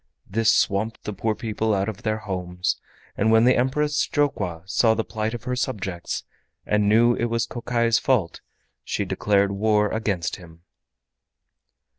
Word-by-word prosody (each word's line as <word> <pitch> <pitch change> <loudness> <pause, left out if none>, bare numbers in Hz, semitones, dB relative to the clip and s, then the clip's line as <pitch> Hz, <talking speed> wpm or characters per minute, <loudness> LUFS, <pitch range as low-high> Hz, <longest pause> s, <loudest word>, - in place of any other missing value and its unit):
This 110 +2 +2
swamped 110 +3 0
the 105 - -4
poor 110 +2 -1
people 110 -1 -1
out 95 0 0
of 110 0 -5
their 110 -2 -1
homes, 90 -4 -3 0.3
and 110 +2 +2
when 110 +1 +5
the 125 - +5
Empress 145 +4 +1
Jokwa 100 - -1
saw 110 +4 +3
the 115 - -1
plight 110 +1 -3
of 115 - -8
her 125 - -2
subjects, 95 -9 -3 0.4
and 105 -1 +2
knew 120 +3 +5
it 120 - -1
was 115 -1 0
Kokai's 115 -1 0
fault, 115 -11 0 0.4
she - - -2
declared 100 -1 +1
war 105 +1 +2
against 100 -7 -1
him. 85 -2 -15
110 Hz, 155 wpm, -24 LUFS, 100-115 Hz, 0.4 s, when